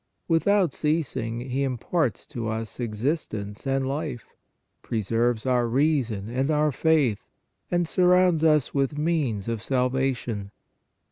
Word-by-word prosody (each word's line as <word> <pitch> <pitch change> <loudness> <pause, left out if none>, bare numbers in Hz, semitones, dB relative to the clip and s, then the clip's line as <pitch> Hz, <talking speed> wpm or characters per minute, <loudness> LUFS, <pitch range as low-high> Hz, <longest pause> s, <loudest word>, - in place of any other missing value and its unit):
Without 180 0 +3
ceasing 140 -7 -1
He 130 +2 -2
imparts 135 - -1
to 115 -2 -5
us 110 +1 -4
existence 110 -2 -3
and 135 0 +1
life, 140 -3 -4 0.5
preserves 115 +2 0
our 125 -2 +2
rea 145 +5 +3
son 110 -4 -5
and 130 +5 -1
our 150 0 +2
faith, 140 -7 +2 0.5
and 175 -1 +1
surrounds 180 -2 +4
us 150 -4 +3
with 140 +1 0
means 150 - 0
of 115 -2 -2
salvation. 125 -5 -1
130 Hz, 125 wpm, -25 LUFS, 115-155 Hz, 0.5 s, surrounds